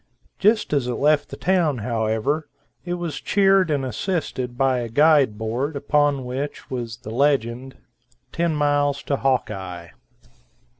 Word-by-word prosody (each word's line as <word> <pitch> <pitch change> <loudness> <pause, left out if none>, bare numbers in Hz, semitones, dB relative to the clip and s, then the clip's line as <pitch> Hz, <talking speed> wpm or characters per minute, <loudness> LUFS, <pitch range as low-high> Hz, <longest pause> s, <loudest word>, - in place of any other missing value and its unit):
Just 215 -4 +2
as 140 -4 +1
it 125 - -2
left 150 +3 +2
the - - -8
town, 175 -7 +1
however, 115 +6 -1 0.3
it 175 0 -3
was 170 -4 -5
cheered 195 -3 +3
and 140 -3 0
assisted 130 - -3
by 130 -1 +2
a 120 -1 -4
guide 145 -3 +4
board, 120 +7 -2
upon 145 -1 +1
which 135 +4 -5
was 120 -3 -4
the 110 -3 -9
legend 130 -1 0 0.5
"10 170 -2 0
Mils 145 -1 +1
to 140 - -1
Hawkeye." 95 -10 -2
140 Hz, 140 wpm, -22 LUFS, 120-150 Hz, 0.5 s, guide